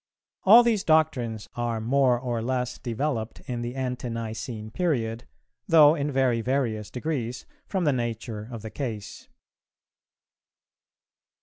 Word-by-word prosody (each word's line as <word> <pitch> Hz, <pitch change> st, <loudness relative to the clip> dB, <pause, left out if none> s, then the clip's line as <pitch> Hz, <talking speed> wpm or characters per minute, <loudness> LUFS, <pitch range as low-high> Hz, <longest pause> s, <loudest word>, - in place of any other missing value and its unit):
All 225 Hz, +5 st, +9 dB
these 225 Hz, -4 st, +1 dB
doctrines 130 Hz, -9 st, +1 dB
are 120 Hz, -2 st, -2 dB
more 125 Hz, +2 st, +3 dB
or 120 Hz, -2 st, -2 dB
less 125 Hz, +1 st, -2 dB
developed 120 Hz, -1 st, -3 dB
in 120 Hz, -3 st, -4 dB
the 120 Hz, +2 st, -4 dB
Ante 125 Hz, -2 st, -3 dB
nicene 115 Hz, -1 st, -5 dB
period, 120 Hz, -8 st, -1 dB, 0.4 s
though 155 Hz, -2 st, +7 dB
in 145 Hz, -2 st, -2 dB
very 130 Hz, -4 st, +2 dB
various 115 Hz, -5 st, -1 dB
degrees, 125 Hz, -2 st, -3 dB, 0.2 s
from 190 Hz, -3 st, -1 dB
the 145 Hz, -4 st, +3 dB
nature 115 Hz, -2 st, -4 dB
of 115 Hz, -3 st, -7 dB
the 110 Hz, -, -6 dB
case. 115 Hz, -7 st, -6 dB
125 Hz, 125 wpm, -26 LUFS, 115-140 Hz, 0.4 s, All